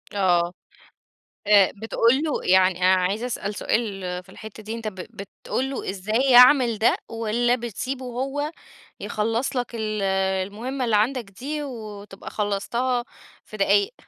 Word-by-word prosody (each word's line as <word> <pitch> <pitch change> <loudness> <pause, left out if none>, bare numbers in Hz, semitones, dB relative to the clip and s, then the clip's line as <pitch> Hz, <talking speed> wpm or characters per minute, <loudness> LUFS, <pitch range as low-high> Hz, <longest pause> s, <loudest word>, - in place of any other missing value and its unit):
آه 175 -3 +2 0.9
آآ، 205 -2 +6
بتقُول 230 +2 +3
له 305 - -1
يعني 185 -1 +4
أنا 185 +1 +5
عايز 195 +5 -1
أسأل 210 -4 -3
سؤال 215 -4 -1 0.2
في 185 - -22
الحتّه 215 +2 -11
دي، 220 - -5
أنت 225 -1 -5
ب 210 - -5
بتقُول 200 +7 -5
له 265 - -4
إزاي 205 +5 -1
يعمِل 250 -2 +7
ده، 220 - +3
والّا 230 +2 +1
بتسيبه 255 +3 -5
هو 270 +5 -3 0.5
يخلّص 225 +5 -2
لك 245 -1 -2
ال 215 -2 -2 0.5
المُهمة 250 +5 -4
اللي 225 - +2
عندك 240 +4 +1
دي، 295 +9 -5
وتبقى 210 -6 -8
خلّصتها 235 +5 -1 0.4
في 215 - -10
دقايق؟ 200 0 +2
220 Hz, 140 wpm, -24 LUFS, 200-250 Hz, 0.9 s, يعمِل